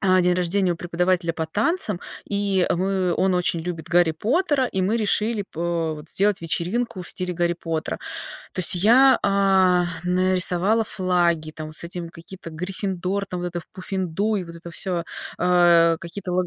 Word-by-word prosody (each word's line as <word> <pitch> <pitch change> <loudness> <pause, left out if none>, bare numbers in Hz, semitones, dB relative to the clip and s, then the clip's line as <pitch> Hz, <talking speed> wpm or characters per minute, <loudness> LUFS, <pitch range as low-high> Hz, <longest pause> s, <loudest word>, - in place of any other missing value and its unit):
а, 185 -1 +3
день 180 0 +2
рождения 180 +1 +1
у - - -6
преподавателя 175 0 0
по 160 -1 -3
танцам, 210 - 0 0.3
и 200 -3 +1
мы, 185 -1 0
он 190 +1 +1
очень 175 -1 +1
любит 165 -1 -6
Гарри 175 -1 +4
Поттера, 275 - +1
и 190 -5 -2
мы 210 +5 +1
решили 215 0 0
по 165 -1 -2
вот 150 +1 -11
сделать 200 -1 +1
вечеринку 185 +6 -1
в - - -3
стиле 180 -1 -3
Гарри 175 0 0
Поттера. 165 -2 -4 0.5
То - - -3
есть 180 - +6
я, 245 +8 +5
а, 190 -3 +3 0.2
нарисовала 185 +4 +2
флаги, 175 -5 0
там 155 0 -8
с 155 +2 -8
этим, 170 -1 -6
какие-то, 170 +1 -11
Гриффиндор, 185 +3 -3
там, 180 -1 -5
вот 180 - -3
это 175 0 -5
в - - -19
Пуффендуй, 190 +2 -2
вот 170 0 -11
это 170 +1 -10
всё, 175 -1 -2 0.3
а 175 -2 +4
какие-то 180 +2 -7
лог 180 0 +1
180 Hz, 170 wpm, -23 LUFS, 170-195 Hz, 0.5 s, есть